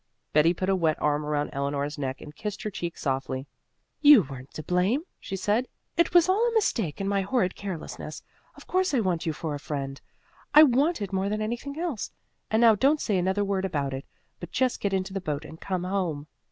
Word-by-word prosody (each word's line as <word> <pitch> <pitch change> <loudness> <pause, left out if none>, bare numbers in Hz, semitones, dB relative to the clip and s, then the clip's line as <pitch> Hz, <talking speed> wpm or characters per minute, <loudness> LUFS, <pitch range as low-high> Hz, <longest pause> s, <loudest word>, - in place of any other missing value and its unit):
Betty 155 +2 +5
put 185 - -2
a 195 - +3
wet 160 -4 +1
arm 150 0 +1
around 150 0 -1
Eleanor's 140 +1 -2
neck 135 -1 -3
and 150 0 -10
kissed 210 -2 -5
her 215 - -3
cheek 170 -3 -5
softly. 135 -1 -2 0.6
"You 290 -8 +9
weren't 135 -1 -10
to 155 - -5
blame," 185 - +1 0.2
she 195 - -5
said. 210 +6 +1 0.3
"It 340 - +3
was 350 0 +6
all 390 +5 +3
a - - -5
mistake 230 - 0
and 195 - -2
my 200 0 +1
horrid 195 -2 +1
carelessness. 170 -5 -6 0.3
Of - - -14
course 370 -4 +1
I - - +3
want 180 -6 0
you 160 - +1
for 155 0 -4
a 145 - -4
friend. 140 -2 -5 0.5
I 305 - +11
want 280 0 +3
it 195 -1 -6
more 190 +1 0
than 215 +1 -1
anything 240 +6 -4
else. 330 - -2 0.4
And 220 +1 +2
now 230 -2 +8
don't 275 +8 +3
say 210 - 0
another 190 +3 +1
word 195 -1 0
about 145 -7 -1
it, 135 +1 -6 0.3
but - - -7
just 255 -2 +1
get 200 - -1
into 190 0 -1
the 195 - -2
boat 150 -3 -3
and 160 +1 -11
come 185 -2 -2
home." 180 -6 -2
190 Hz, 220 wpm, -27 LUFS, 150-225 Hz, 0.6 s, I